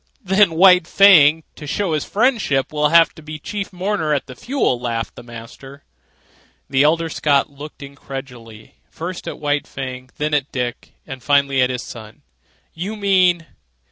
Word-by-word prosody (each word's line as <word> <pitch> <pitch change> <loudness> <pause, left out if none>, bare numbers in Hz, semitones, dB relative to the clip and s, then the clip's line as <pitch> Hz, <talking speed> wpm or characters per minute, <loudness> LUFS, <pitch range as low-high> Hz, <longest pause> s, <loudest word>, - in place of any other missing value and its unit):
"Then 190 -3 +3
White 180 -1 +6
Fang, 160 -6 +6
to 150 - -10
show 185 +2 -1
his 150 - -1
friendship, 205 - 0
will 150 0 +1
have 165 +1 +5
to - - -14
be 155 0 -8
chief 200 +6 -6
mourner 180 -4 -1
at 135 - -3
the 130 - -10
funeral," 240 - -1
laughed 115 -2 -3
the - - -11
master. 120 +4 -12 0.8
The 135 0 +1
elder 165 +3 +2
Scott 145 -2 +1
looked 145 +1 -11
incredulously, 130 -5 -10
first 175 +2 -7
at - - -5
White 145 -1 -1
Fang, 130 -1 -7
then 150 0 -2
at 145 -1 0
Dick, 125 -2 -5
and 135 -1 -8
finally 140 -1 +2
at 125 - +2
his 125 -1 -4
son. 110 -2 -11 0.5
"You 190 +6 -5
mean 185 -4 +2
150 Hz, 165 wpm, -19 LUFS, 135-175 Hz, 0.8 s, White